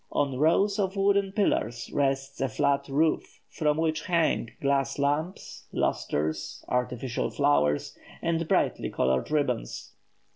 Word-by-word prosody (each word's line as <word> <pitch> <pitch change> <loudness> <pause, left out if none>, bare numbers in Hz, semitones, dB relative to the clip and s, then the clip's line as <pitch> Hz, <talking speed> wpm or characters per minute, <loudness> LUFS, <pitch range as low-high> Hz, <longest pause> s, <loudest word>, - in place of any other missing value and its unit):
On 135 -3 0
rows 195 +7 +3
of 190 -1 0
wooden 200 0 +2
pillars 120 - 0
rests 135 -1 0
a 135 - +1
flat 140 +5 +1
roof, 155 +3 0
from 150 -1 +1
which 160 +2 0
hang 165 -9 +1
glass 140 -1 +1
lamps, 145 +6 -2
lustres, 75 +2 -2
artificial 125 0 -1
flowers, 75 0 +1 0.2
and 165 -1 -1
brightly - - +1
coloured 65 0 0
ribbons. 140 - -2
140 Hz, 120 wpm, -27 LUFS, 125-165 Hz, 0.2 s, rows